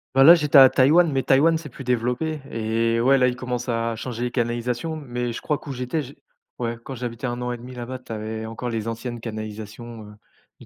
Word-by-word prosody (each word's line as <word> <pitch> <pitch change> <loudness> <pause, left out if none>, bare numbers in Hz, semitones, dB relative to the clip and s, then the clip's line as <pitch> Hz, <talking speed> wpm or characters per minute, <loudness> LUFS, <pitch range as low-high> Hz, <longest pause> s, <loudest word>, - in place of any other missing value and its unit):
Bah, 135 0 +7
là, 170 +3 +11
j'étais 150 -3 +3
à 135 -1 +10
Taïwan, 155 +8 +5
mais 135 -2 0
Taïwan, 160 +5 +4
c'est 155 -2 -9
plus 135 +1 -10
développé 125 +6 -1
et 115 +1 0
ouais, 135 +3 +4
là, 125 -1 +4
ils 125 - -5
commencent 125 -1 -4
à 115 0 -1
changer 120 +1 -5
les 125 - -2
canalisations, 120 +6 -2
mais 125 -4 -4
je 115 - -5
crois 150 - 0
qu'où 140 - -9
j'étais 125 +4 -2
j'ai 140 0 -10 0.4
ouais, 115 -1 -2
quand 135 - -7
j'habitais 120 +1 -4
1,5 125 0 -4
là-bas, 125 +1 -6
tu 125 - -13
avais 110 0 -4
encore 115 +2 -5
les 115 -1 -3
anciennes 115 +1 -5
canalisations, 110 +1 -7
heu, - - -13 0.5
et - - -14
125 Hz, 215 wpm, -23 LUFS, 115-135 Hz, 0.5 s, là